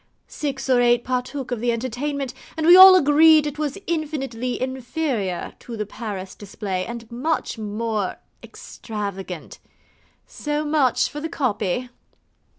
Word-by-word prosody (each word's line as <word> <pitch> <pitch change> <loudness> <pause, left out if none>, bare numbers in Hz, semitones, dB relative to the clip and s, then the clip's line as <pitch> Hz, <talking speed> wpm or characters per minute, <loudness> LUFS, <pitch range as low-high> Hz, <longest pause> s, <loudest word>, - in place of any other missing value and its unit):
Six 275 -3 -4
or 255 -2 +4
eight 240 0 +3
partook 255 +1 -3
of 245 - -2
the 240 +1 +1
entertainment, 255 +3 -3 0.2
and 315 - -1
we 345 +2 +9
all 375 0 +11
agreed 310 -1 +6
it 295 0 -5
was 295 -3 -2
infinitely 270 -7 -3
inferior 255 - -3
to 235 -2 -8
the 210 - -2
Paris 200 -3 -6
display, 195 -2 -5
and 235 -1 -8
much 260 0 -2
more 215 -1 -2 0.3
extravagant. 195 -6 -7 0.7
So 295 0 -3
much 295 -5 +2
for 295 - -7
the 320 - -4
copy. 245 - -1
250 Hz, 135 wpm, -22 LUFS, 220-295 Hz, 0.7 s, all